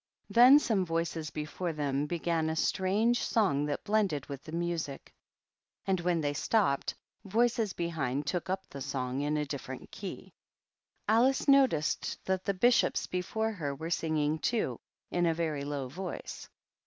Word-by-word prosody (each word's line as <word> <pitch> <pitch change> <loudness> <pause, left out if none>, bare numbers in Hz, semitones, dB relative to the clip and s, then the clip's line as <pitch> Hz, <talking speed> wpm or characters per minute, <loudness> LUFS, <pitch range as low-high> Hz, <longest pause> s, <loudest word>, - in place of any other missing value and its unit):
Then 250 +4 +9
some 220 -9 +1
voices 165 -2 -2
before 155 +4 -4
them 145 -1 -1
began 165 -1 0
a 160 - -1
strange 205 +8 +2
song 165 -11 +2
that 145 - -3
blended 200 -10 +1
with 140 -1 -7
the 155 - -9
music, 170 -4 -3 0.7
and 190 -2 +1
when 175 -1 +1
they 145 -1 0
stopped, 145 -3 +1 0.3
voices 225 0 +1
behind 150 -5 -2
took 180 +3 -2
up 190 +1 -2
the 140 - -9
song 130 -1 -2
in 150 +1 0
a 150 - 0
dijfferent 130 -2 -7
key. - - -8 0.7
Alice 240 +7 +3
noticed 265 - +3
that 190 0 -1
the 200 - +1
Bishops 240 +6 +3
before 220 +5 -2
her 150 -9 -4
were 160 +4 -6
singing, 155 -2 0
too, 155 - -1 0.3
in 175 -1 +2
a 165 - +2
very 155 -4 -2
low 140 -2 -3
voice. 180 +7 -7
165 Hz, 155 wpm, -31 LUFS, 145-195 Hz, 0.7 s, Then